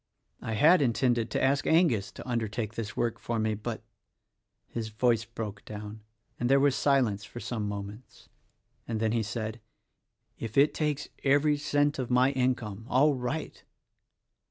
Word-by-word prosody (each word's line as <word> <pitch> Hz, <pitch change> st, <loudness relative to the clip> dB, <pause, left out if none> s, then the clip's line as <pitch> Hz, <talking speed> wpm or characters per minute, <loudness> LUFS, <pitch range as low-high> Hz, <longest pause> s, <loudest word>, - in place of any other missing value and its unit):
"I 110 Hz, -, -3 dB
had 155 Hz, -, +5 dB
intended 120 Hz, -2 st, +1 dB
to -, -, -1 dB
ask 140 Hz, +2 st, +2 dB
Angus 160 Hz, -, +3 dB
to -, -, -10 dB
undertake 110 Hz, -2 st, -2 dB
this 110 Hz, -3 st, -5 dB
work 120 Hz, -2 st, 0 dB
for 115 Hz, -, -3 dB
me, 110 Hz, 0 st, +1 dB
but 105 Hz, -1 st, -5 dB, 0.3 s
— -, -, -54 dB
" -, -, -53 dB
his 115 Hz, -2 st, -4 dB
voice 115 Hz, +1 st, +1 dB
broke 110 Hz, -3 st, -6 dB
down 105 Hz, +1 st, -8 dB, 0.4 s
and 120 Hz, -, 0 dB
there 135 Hz, +1 st, +5 dB
was 140 Hz, -1 st, +3 dB
silence 125 Hz, -8 st, +2 dB
for 120 Hz, -, -9 dB
some 110 Hz, -4 st, -3 dB
moments, 105 Hz, +3 st, -8 dB, 0.6 s
and 115 Hz, -2 st, -2 dB
then 110 Hz, -1 st, +1 dB
he 115 Hz, 0 st, +1 dB
said, 110 Hz, +1 st, -4 dB, 0.8 s
"If 115 Hz, +1 st, -5 dB
it 140 Hz, +2 st, +5 dB
takes 150 Hz, -2 st, -2 dB
every 145 Hz, +2 st, +4 dB
cent 145 Hz, 0 st, +1 dB
of 125 Hz, -, -2 dB
my 125 Hz, +2 st, +4 dB
income 120 Hz, -5 st, -1 dB
— -, -, -15 dB
all 145 Hz, +4 st, +4 dB
right! 130 Hz, +4 st, -4 dB
120 Hz, 170 wpm, -29 LUFS, 110-135 Hz, 0.8 s, had